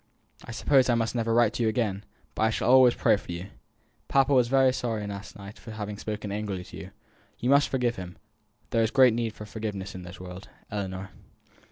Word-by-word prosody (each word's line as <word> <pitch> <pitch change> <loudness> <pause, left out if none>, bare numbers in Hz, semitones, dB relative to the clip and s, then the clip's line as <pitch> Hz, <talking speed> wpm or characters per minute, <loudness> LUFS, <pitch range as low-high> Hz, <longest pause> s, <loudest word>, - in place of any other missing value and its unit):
I - - -13
suppose 130 +2 +3
I 120 - +4
must 115 -1 0
never 115 -2 -1
write 115 -1 +4
to - - -3
you 115 - +3
again: 105 -3 -1 0.3
but - - -4
I 110 - +4
shall 115 - +1
always 130 -2 +7
pray - - +3
for 95 - -9
you. 85 +3 -6 0.6
Papa 135 +1 +3
was 125 -3 +4
very 130 0 +4
sorry 115 -4 -2
last 100 0 -7
night 100 +1 -11
for - - -12
having 105 -1 -5
spoken 105 -1 -4
angrily 100 -3 -3
to - - -12
you. 95 - -9 0.5
You 125 +3 0
must 140 +1 +5
forgive 125 -3 0
him 90 -1 -8 0.5
there 115 - +2
is 110 - +2
great 130 -1 +5
need 115 -1 -2
for 105 - -8
forgiveness 100 -2 -5
in 95 - -7
this 90 +1 -10
world. 90 +1 -9 0.2
ELLINOR." 95 -2 -4
110 Hz, 215 wpm, -27 LUFS, 100-120 Hz, 0.6 s, always